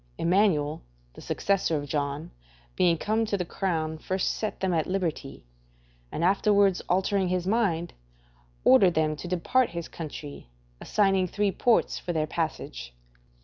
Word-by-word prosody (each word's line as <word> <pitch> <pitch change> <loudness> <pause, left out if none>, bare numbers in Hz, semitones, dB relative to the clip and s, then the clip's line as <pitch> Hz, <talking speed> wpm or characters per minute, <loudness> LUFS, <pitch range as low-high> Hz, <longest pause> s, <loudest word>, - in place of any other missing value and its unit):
Emmanuel, 165 -5 +2 0.3
the - - -12
successor 195 -5 0
of 145 0 -5
John, 145 0 -3 0.4
being 170 -2 +3
come 220 +6 0
to 205 -2 -1
the 180 - -2
crown, 160 -4 -2
first 185 +3 -1
set 215 - -4
them 190 -2 0
at 160 -2 0
liberty, 170 - -3 0.7
and - - -3
afterwards 200 0 +3
altering 190 +1 +1
his 180 0 -1
mind, 190 -5 0 0.7
ordered 175 +7 +6
them 155 -1 +1
to 165 - -8
depart 205 +8 +1
his 170 -1 -5
country, 150 - -8 0.3
assigning 195 -3 +2
three 205 +2 0
ports 230 +5 +2
for 175 - -4
their 155 -2 0
passage. 65 - -4
175 Hz, 145 wpm, -27 LUFS, 155-195 Hz, 0.7 s, ordered